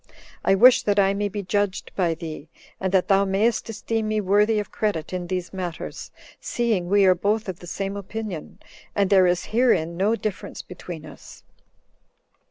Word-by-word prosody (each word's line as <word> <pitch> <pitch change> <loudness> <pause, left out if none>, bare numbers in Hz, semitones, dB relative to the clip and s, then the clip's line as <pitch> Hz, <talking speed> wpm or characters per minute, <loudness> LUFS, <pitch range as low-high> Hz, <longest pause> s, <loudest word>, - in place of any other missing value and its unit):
I 195 - +4
wish 245 +5 +7
that 205 -1 0
I 195 -1 +4
may 205 +1 -1
be 200 +1 -5
judged 200 +1 -1
by 170 -4 +1
thee, 160 -2 -8 0.3
and 190 -1 -1
that 190 -2 +2
thou 195 0 +4
mayst 210 +4 +1
esteem 225 0 -2
me 215 0 0
worthy 210 +2 +3
of 210 - -3
credit 185 -7 -2
in 180 -1 -3
these 180 0 -3
matters, 180 -3 -5 0.3
seeing 220 -7 -1
we 200 0 +5
are 185 - +7
both 205 +4 -1
of 185 -2 -5
the 175 - -11
same 195 +2 -3
opinion, 200 -4 -6 0.4
and 200 -1 +1
there 190 -2 +6
is 175 0 0
herein 170 -9 +2
no 205 +5 +2
difference 210 -2 -5
between 175 -3 -9
us." - - -13
195 Hz, 175 wpm, -24 LUFS, 180-210 Hz, 0.4 s, wish